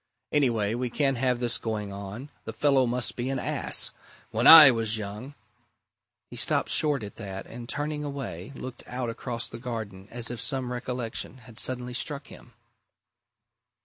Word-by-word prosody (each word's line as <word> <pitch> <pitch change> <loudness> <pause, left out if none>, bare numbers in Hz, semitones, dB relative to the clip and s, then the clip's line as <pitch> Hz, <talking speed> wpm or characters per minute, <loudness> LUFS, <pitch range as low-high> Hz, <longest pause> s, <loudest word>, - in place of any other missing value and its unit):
Anyway, 115 -8 +2
we 125 +1 -2
can't 135 +1 +1
have 125 0 +1
this 120 -1 0
going 105 -3 -3
on. 100 +8 -7
The 115 - -5
fellow 135 +2 +3
must 120 0 0
be 125 +2 -3
an 135 - -1
ass! - - +1 0.4
When - - +2
I 155 -4 +12
was 115 -2 0
young 105 +7 -7 0.5
" - - -60
He - - -8
stopped - - +2
short 145 -6 +2
at 100 - -9
that, 95 -3 -6
and 120 +1 -9
turning 150 +1 -3
away, 130 - -6
looked 130 -1 -8
out 125 -1 -3
across 115 0 -4
the - - -9
garden 110 -6 -6
as 120 0 -2
if 120 - -4
some 130 -3 -1
recollection 125 0 -4
had 115 -3 -12
suddenly 125 -1 -3
struck 140 +2 -4
him. - - -14
120 Hz, 170 wpm, -27 LUFS, 110-135 Hz, 0.5 s, I